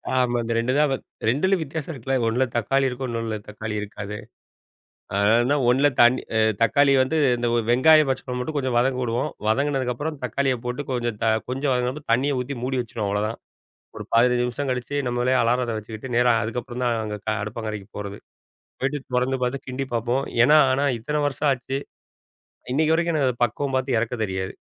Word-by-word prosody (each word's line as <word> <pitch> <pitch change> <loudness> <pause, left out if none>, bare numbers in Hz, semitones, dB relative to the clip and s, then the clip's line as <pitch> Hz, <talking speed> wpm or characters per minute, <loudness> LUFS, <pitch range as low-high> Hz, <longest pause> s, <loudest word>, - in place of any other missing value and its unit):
ஆமா 125 -1 +2
இந்த 115 0 -2
2 120 +3 +1
தான் 150 -1 +3
வத், 135 - -3 0.2
2 185 +8 +2
வித்தியாசம் 155 +1 -5
இருக்குல்ல. 135 +1 -2
ஒண்ணுல 125 +4 +2
தக்காளி 135 +4 +1
இருக்கு, 125 +1 -4
இன்னொன்ல 115 -2 -3
தக்காளி 105 0 -5
இருக்காது. 105 0 -6 1.0
அதனால்தான் 120 +7 +3
ஒண்ணுல 135 +4 +4
தண் 120 +2 +6 0.2
அ - - +3 0.2
தக்காளி 140 +4 +4
வந்து, 155 +5 0 0.2
இந்த 120 - -1 0.2
வெங்காயம் 155 +4 +6
பச்சை 130 - -1
மொளகா 125 0 -3
மட்டும் 150 +4 -3
கொஞ்சம் 130 -3 -1
வதங்க 125 +1 +2
விடுவோம். 120 +1 -1 0.2
வதங்குனதுக்கு 135 +1 +1
அப்புறம் 150 +2 -4
தக்காளிய 130 +2 0
போட்டு 125 +4 -3
கொஞ்சம் 120 -3 -2
த - - +2 0.2
கொஞ்சம் 135 +2 -1
வதங்குனப்ப 125 +4 -2
தண்ணீய 135 +3 +1
ஊத்தி 135 +3 -5
மூடி 130 0 -1
வச்சுருவோம் 110 -3 -4
அவ்ளோதான். 105 +2 -1 0.6
ஒரு - - -6
15 125 +1 +4
நிமிஷம் 125 +3 -3
கழிச்சு, 125 +3 -3
நம்மளே 120 +1 +1
அலாரத்த 120 -1 +1
வச்சுக்கிட்டு, 110 +4 -8
நேரா 120 0 +4
அதுக்கப்புறம் 120 +2 -4
தான், 120 - +2
அங்க 105 -1 -4 0.3
அடுப்பங்கரைக்கு 105 -1 -5
போறது. 100 0 -6 0.6
போயிட்டு 135 +2 -1 0.2
தொறந்து 130 +1 +1
பாத்து, 130 +2 -3
கிண்டி 135 +1 -3
பார்ப்போம். 120 +4 0 0.2
ஏன்னா 150 +4 +6
ஆனா, 140 +2 +1
இத்தன 150 +5 -1
வருஷம் 145 +1 0
ஆச்சு. 135 +1 -3 0.9
இன்னைக்கு 155 +3 +3
வரைக்கும் 170 0 +1
எனக்கு 125 -3 0
பக்குவம் 135 +4 -2
பாத்து 130 -1 0
எறக்க 115 +2 -1
தெரியாது. 95 0 -4
125 Hz, 175 wpm, -23 LUFS, 115-135 Hz, 1.0 s, தண்